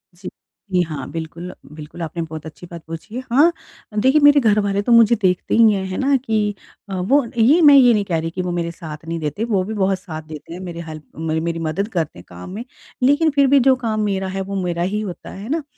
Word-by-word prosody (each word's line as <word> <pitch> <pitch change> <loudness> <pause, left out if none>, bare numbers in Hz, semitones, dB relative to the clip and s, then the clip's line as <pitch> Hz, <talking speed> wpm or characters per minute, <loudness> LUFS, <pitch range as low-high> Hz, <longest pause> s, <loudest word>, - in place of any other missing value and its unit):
जी। 180 +1 -8 0.4
जी, 180 -1 +3
हाँ। 155 -5 -4
बिल्कुल, 165 +2 -6 0.2
बिल्कुल 155 +2 -10
आपने 165 +1 -4
बहुत 160 -1 -7
अच्छी 160 +2 -10
बात 170 -1 -9
पूछी 165 +7 -8
है। 255 - -3
हाँ, 295 +7 +5 0.5
देखिए 265 +6 +4
मेरे 290 0 +7
घर 215 -5 +3
वाले 200 0 0
तो 240 - -1
मुझे 230 0 +6
देखते 180 -2 +1
ही 225 -1 +6
हैं, 195 - -2
है 185 - -4
ना? 275 +1 +2
कि 215 -4 -1 0.3
अ, 195 - -5
वो 250 +10 +2
ये 280 +10 +5
मैं 290 -2 +8
ये 245 -3 +7
नहीं 210 - +1
कह 170 -3 -1
रही 165 +1 -3
कि 185 - -3
वो 180 -1 -3
मेरे 170 -1 -2
साथ 160 -2 -9
नहीं 165 0 -3
देते, 155 +8 -3
वो 205 -5 0
भी 215 +4 -5
बहुत 195 -2 0
साथ 160 -5 -7
देते 155 +1 -9
हैं 175 - -7
मेरे 170 -2 -6
हेल्प 155 -1 -9
म 160 0 -2
मेरी 170 0 -2
मदद 165 +6 -2
करते 160 - -2
हैं 90 - -12
काम 90 0 -10
में। 210 +5 -6 0.4
लेकिन 290 +5 +4
फ़िर 280 -1 +5
भी 280 +1 +5
जो 265 +1 +4
काम 225 -4 -2
मेरा 195 -1 -1
है 190 +1 -3
वो 195 +1 -5
मेरा 175 -1 -2
ही 205 +4 -1
होता 190 -5 -7
है। 195 - -9
है 230 - -8
ना? 315 +1 -1
190 Hz, 255 wpm, -20 LUFS, 165-230 Hz, 0.5 s, मैं